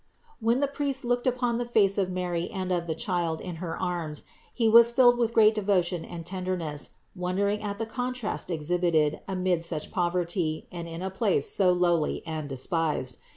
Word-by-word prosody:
When 230 Hz, +3 st, +2 dB
the 285 Hz, -, +3 dB
priest 275 Hz, -2 st, -2 dB
looked 245 Hz, +1 st, 0 dB
upon 245 Hz, -1 st, +1 dB
the 245 Hz, -, -1 dB
face 205 Hz, -4 st, +3 dB
of 190 Hz, -2 st, +1 dB
Mary 180 Hz, -2 st, -2 dB
and 190 Hz, -3 st, -4 dB
of 175 Hz, -1 st, -1 dB
the 160 Hz, -, -2 dB
Child 170 Hz, -2 st, -1 dB
in 175 Hz, -3 st, -6 dB
her 165 Hz, -1 st, -4 dB
arms 170 Hz, -5 st, -3 dB, 0.3 s
he 230 Hz, -2 st, +1 dB
was 235 Hz, +1 st, +8 dB
filled 245 Hz, 0 st, +5 dB
with 235 Hz, -1 st, +2 dB
great 220 Hz, -1 st, +6 dB
devotion 185 Hz, -5 st, 0 dB
and 170 Hz, -1 st, -8 dB
tenderness, 180 Hz, -5 st, -3 dB, 0.2 s
wondering 200 Hz, +3 st, -1 dB
at 205 Hz, -1 st, -4 dB
the 225 Hz, -, -2 dB
contrast 245 Hz, -2 st, -3 dB
exhibited 165 Hz, -2 st, +1 dB
amid 185 Hz, -3 st, 0 dB
such 165 Hz, -2 st, -3 dB
poverty 175 Hz, -3 st, -1 dB
and 170 Hz, -1 st, -6 dB
in 165 Hz, +2 st, -6 dB
a 190 Hz, -, -3 dB
place 190 Hz, -7 st, +1 dB
so 185 Hz, -3 st, +4 dB
lowly 175 Hz, -3 st, +1 dB
and 155 Hz, -3 st, -4 dB
despised. 135 Hz, -2 st, -1 dB
180 Hz, 180 wpm, -27 LUFS, 170-220 Hz, 0.3 s, was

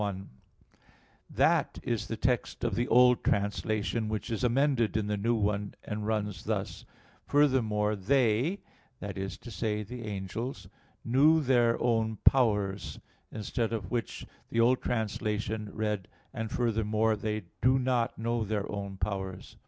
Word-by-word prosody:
1: 100 Hz, -2 st, -3 dB, 1.0 s
That -, -, +2 dB
is -, -, -2 dB
the -, -, -4 dB
text -, -, -1 dB
of -, -, 0 dB
the 120 Hz, -, 0 dB
old 125 Hz, +1 st, +5 dB
translation, 105 Hz, +2 st, 0 dB
which 110 Hz, +1 st, -3 dB
is 115 Hz, -, -2 dB
amended 125 Hz, -3 st, +2 dB
in 110 Hz, -, 0 dB
the 105 Hz, 0 st, -1 dB
new 115 Hz, +4 st, +1 dB
one, 105 Hz, -1 st, -1 dB
and 105 Hz, 0 st, -4 dB
runs 105 Hz, -2 st, -2 dB
thus: -, -, -3 dB, 0.4 s
"furthermore 110 Hz, -8 st, +2 dB
they," 125 Hz, -, +2 dB, 0.4 s
that 100 Hz, -1 st, -5 dB
is 95 Hz, 0 st, -4 dB
to 120 Hz, -, -11 dB
say 105 Hz, 0 st, -1 dB
the 120 Hz, +2 st, -7 dB
angels, 105 Hz, +5 st, -5 dB, 0.4 s
"knew 145 Hz, +7 st, +5 dB
their 120 Hz, -5 st, +3 dB
own 115 Hz, -2 st, +1 dB
powers": 105 Hz, -7 st, +2 dB, 0.3 s
instead 110 Hz, +1 st, -2 dB
of 105 Hz, -6 st, -4 dB
which 120 Hz, -2 st, -3 dB, 0.2 s
the 115 Hz, -, -1 dB
old 125 Hz, +2 st, +4 dB
translation 110 Hz, -1 st, -2 dB
read 105 Hz, -3 st, -2 dB, 0.3 s
"and 115 Hz, -3 st, -3 dB
furthermore 110 Hz, -2 st, +1 dB
they 105 Hz, 0 st, -3 dB, 0.2 s
do 130 Hz, +2 st, +4 dB
not 125 Hz, -2 st, 0 dB
know 115 Hz, +1 st, -1 dB
their 105 Hz, -1 st, -2 dB
own 100 Hz, -1 st, -5 dB
powers." 95 Hz, -2 st, -4 dB
110 Hz, 145 wpm, -30 LUFS, 105-120 Hz, 1.0 s, old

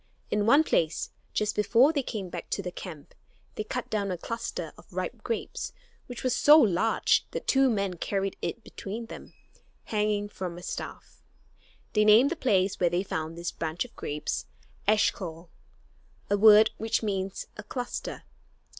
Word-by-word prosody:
In 210 Hz, 0 st, +1 dB
one 280 Hz, +6 st, +7 dB
place, 165 Hz, -, 0 dB, 0.2 s
just 210 Hz, 0 st, 0 dB
before 240 Hz, +8 st, +4 dB
they 285 Hz, -, +1 dB
came 210 Hz, -7 st, -5 dB
back -, -, -7 dB
to 200 Hz, -, -2 dB
the 180 Hz, -, -4 dB
camp, 160 Hz, -6 st, -9 dB, 0.4 s
they 215 Hz, -, -3 dB
cut 250 Hz, +3 st, -4 dB
down 205 Hz, -2 st, 0 dB
a 180 Hz, -, -2 dB
cluster 230 Hz, +6 st, -5 dB
of -, -, -18 dB
ripe -, -, -4 dB
grapes 485 Hz, +1 st, -4 dB, 0.3 s
which 245 Hz, -1 st, -7 dB
was 255 Hz, -2 st, +1 dB
so 300 Hz, +1 st, +8 dB
large 225 Hz, -, +3 dB
that -, -, -5 dB
two 270 Hz, -1 st, +4 dB
men 200 Hz, -5 st, -1 dB
carried 195 Hz, +2 st, -1 dB
it 235 Hz, -, -4 dB
between 220 Hz, +4 st, -6 dB
them, -, -, -10 dB, 0.5 s
hanging 210 Hz, -1 st, 0 dB
from 180 Hz, -4 st, -6 dB
a 175 Hz, -, -10 dB
staff. -, -, -7 dB, 0.7 s
They 210 Hz, -, +4 dB
named 220 Hz, +7 st, +6 dB
the -, -, 0 dB
place 195 Hz, -, +1 dB
where 175 Hz, -, +3 dB
they 175 Hz, +2 st, 0 dB
found 160 Hz, -3 st, -4 dB
this 170 Hz, 0 st, -3 dB
bunch 160 Hz, +6 st, -3 dB
of 240 Hz, -, -16 dB
grapes 150 Hz, +1 st, -3 dB, 0.4 s
Eshcol, 175 Hz, -5 st, +1 dB, 0.8 s
a -, -, +5 dB
word 215 Hz, +1 st, +8 dB
which 225 Hz, +2 st, -1 dB
means 195 Hz, -2 st, -2 dB
"a -, -, -7 dB
cluster." 245 Hz, +4 st, -5 dB
210 Hz, 165 wpm, -28 LUFS, 185-230 Hz, 0.8 s, so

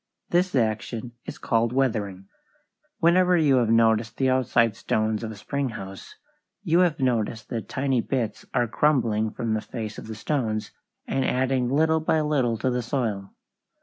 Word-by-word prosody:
This 180 Hz, 0 st, +2 dB
action 115 Hz, +1 st, -1 dB
is -, -, -7 dB
called 115 Hz, +1 st, 0 dB
weathering. 105 Hz, -8 st, -1 dB, 0.7 s
Whenever 180 Hz, +1 st, +4 dB
you 145 Hz, -5 st, +4 dB
have 120 Hz, -3 st, +2 dB
noticed 115 Hz, -1 st, +3 dB
the 130 Hz, -1 st, +2 dB
outside 120 Hz, -3 st, +2 dB
stones 110 Hz, 0 st, -1 dB
of 110 Hz, -, -3 dB
a 110 Hz, -, -7 dB
spring 135 Hz, +6 st, -3 dB
house, 95 Hz, -3 st, -9 dB, 0.5 s
you 165 Hz, +2 st, +3 dB
have 175 Hz, -5 st, +2 dB
noticed 115 Hz, -4 st, -1 dB
that 115 Hz, -2 st, -4 dB
tiny 130 Hz, -2 st, 0 dB
bits 115 Hz, -4 st, -2 dB
are 120 Hz, -1 st, +1 dB
crumbling 115 Hz, -5 st, +1 dB
from 115 Hz, +1 st, -3 dB
the 110 Hz, -, 0 dB
face 110 Hz, -2 st, -6 dB
of -, -, -10 dB
the 110 Hz, -, -6 dB
stones, 110 Hz, -3 st, -2 dB, 0.3 s
and 135 Hz, -, -1 dB
adding 130 Hz, -1 st, +1 dB
little 160 Hz, +4 st, +3 dB
by 160 Hz, 0 st, +1 dB
little 135 Hz, -7 st, +1 dB
to 130 Hz, -, 0 dB
the 125 Hz, 0 st, -1 dB
soil. 115 Hz, -6 st, -3 dB
120 Hz, 165 wpm, -25 LUFS, 110-135 Hz, 0.7 s, Whenever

